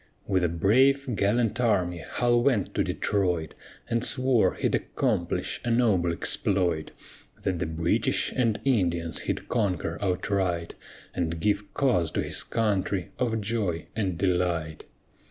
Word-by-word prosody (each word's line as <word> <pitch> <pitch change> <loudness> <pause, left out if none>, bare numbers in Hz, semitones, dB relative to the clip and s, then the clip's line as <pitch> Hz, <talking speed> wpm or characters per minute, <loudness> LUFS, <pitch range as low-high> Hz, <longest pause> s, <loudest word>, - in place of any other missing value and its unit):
With 95 -2 +1
a 85 - +2
brave, 130 - +3
gallant 110 +3 +1
army 90 -7 +1
HULL 120 +7 +1
went 120 -7 +1
to - - +1
Detroit, 90 -6 -1 0.3
And 115 0 0
swore 130 -3 +2
he'd - - -1
accomplish - - -1
a 120 - -2
noble 110 -8 +2
exploit; 85 -1 0 0.5
That 90 -3 -1
the 85 - -1
British 80 +1 0
and 115 -4 +1
Indians 85 - +1
he'd - - -2
conquer 90 -7 -1
outright, 90 -2 -1 0.4
And 85 -2 -2
give 100 +2 0
cause 90 -12 +2
to - - 0
his - - +1
country 100 -4 -1
of 115 -3 0
joy 100 -6 -2
and 95 -6 -1
delight. 90 -4 -1
100 Hz, 135 wpm, -27 LUFS, 85-115 Hz, 0.5 s, brave